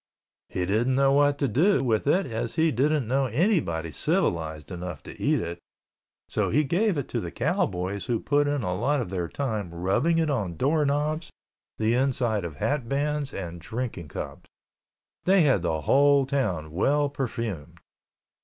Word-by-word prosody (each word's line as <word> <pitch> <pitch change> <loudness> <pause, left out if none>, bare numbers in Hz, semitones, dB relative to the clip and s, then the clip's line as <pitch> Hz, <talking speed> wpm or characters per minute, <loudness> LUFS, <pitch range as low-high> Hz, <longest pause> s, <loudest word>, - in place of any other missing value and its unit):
He 90 - -2
didn't 115 +7 +1
know 135 0 +4
what 145 0 +4
to 140 - +1
do 160 - +3
with 115 -1 0
it 185 +7 +3
as 115 -2 -4
he 160 0 +3
didn't 140 +1 +1
know 135 +3 +2
anyone 120 - 0
civilized 80 +2 -1
enough 90 -2 -6
to - - -11
eat - - +2
it, 85 0 -5 0.7
so - - 0
he 150 +6 +3
gave 175 +6 +1
it 140 - -2
to - - -1
the - - -4
cowboys 95 +2 -1
who 120 -2 0
put 145 0 +1
in 145 -3 0
a 90 - -1
lot 135 +10 +1
of 115 -7 -4
their 90 -3 -2
time 110 -6 -3
rubbing 95 - +1
it 165 -1 +2
on 100 - -2
door 150 +2 +2
knobs, 150 +3 -1 0.5
the 110 +1 +1
inside 120 -6 +1
of 80 -3 -6
hat 130 - -1
bands 145 0 -1
and 85 -2 -6
drinking 110 -4 -5
cups. - - -7 0.8
They 190 0 +5
had 135 - +3
the 80 -3 -1
whole 140 - +4
town 105 - -1
well 145 - +2
perfumed. 115 - -4
125 Hz, 175 wpm, -26 LUFS, 90-145 Hz, 0.8 s, They